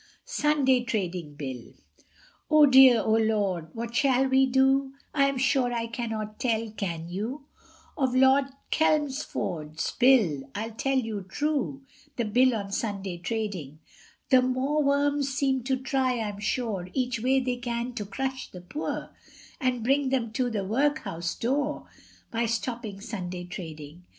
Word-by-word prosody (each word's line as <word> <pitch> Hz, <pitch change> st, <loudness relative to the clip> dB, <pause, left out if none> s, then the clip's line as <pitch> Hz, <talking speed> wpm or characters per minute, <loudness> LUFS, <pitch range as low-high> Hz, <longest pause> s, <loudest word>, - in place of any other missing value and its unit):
SUNDAY 275 Hz, -4 st, +2 dB
TRADING 180 Hz, -9 st, -3 dB
BILL. 130 Hz, -5 st, -7 dB, 0.8 s
Oh 305 Hz, -1 st, +7 dB
dear, 260 Hz, -4 st, +7 dB
oh 220 Hz, 0 st, +3 dB
lor, 200 Hz, -7 st, 0 dB
what 235 Hz, 0 st, -5 dB
shall 270 Hz, -1 st, +3 dB
we 265 Hz, 0 st, +4 dB
do? 265 Hz, +1 st, +3 dB, 0.2 s
I 275 Hz, -2 st, +4 dB
am 275 Hz, -1 st, 0 dB
sure 255 Hz, -1 st, +2 dB
I 230 Hz, -1 st, -1 dB
cannot 225 Hz, -2 st, -4 dB
tell, 225 Hz, -3 st, 0 dB
can 170 Hz, -6 st, -4 dB
you? 225 Hz, -, -5 dB, 0.5 s
Of 260 Hz, -3 st, 0 dB
Lord 265 Hz, +1 st, +5 dB, 0.3 s
Chelmsford's 270 Hz, -, -1 dB
Bill, 200 Hz, -, +4 dB
I'll 220 Hz, +2 st, -3 dB
tell 270 Hz, +4 st, 0 dB
you 225 Hz, -5 st, -2 dB
true 285 Hz, -1 st, -1 dB, 0.3 s
The 235 Hz, -, -1 dB
Bill 250 Hz, +3 st, +3 dB
on 200 Hz, -2 st, -4 dB
Sunday 195 Hz, -4 st, -3 dB
trading. 185 Hz, -7 st, -4 dB, 0.5 s
The 260 Hz, -1 st, +7 dB
mawworms 280 Hz, +2 st, +1 dB
seem 265 Hz, 0 st, +1 dB
to 265 Hz, 0 st, +1 dB
try, 260 Hz, -2 st, 0 dB
I'm 205 Hz, -2 st, -4 dB
sure, 205 Hz, -4 st, -2 dB
Each 250 Hz, -2 st, -1 dB
way 260 Hz, +4 st, +3 dB
they 250 Hz, -1 st, -1 dB
can 240 Hz, 0 st, -3 dB
to 215 Hz, -4 st, -4 dB
crush 265 Hz, +5 st, -4 dB
the 180 Hz, -, -10 dB
poor, 290 Hz, -, -5 dB, 0.5 s
And 255 Hz, -5 st, 0 dB
bring 275 Hz, +2 st, +2 dB
them 245 Hz, -4 st, 0 dB
to 250 Hz, +2 st, 0 dB
the 210 Hz, -4 st, -2 dB
workhouse 210 Hz, -, -1 dB
door, 285 Hz, +5 st, -1 dB, 0.5 s
By 230 Hz, 0 st, 0 dB
stopping 230 Hz, -2 st, -3 dB
Sunday 185 Hz, -5 st, -5 dB
trading. 165 Hz, -2 st, -9 dB
240 Hz, 145 wpm, -27 LUFS, 205-265 Hz, 0.8 s, Oh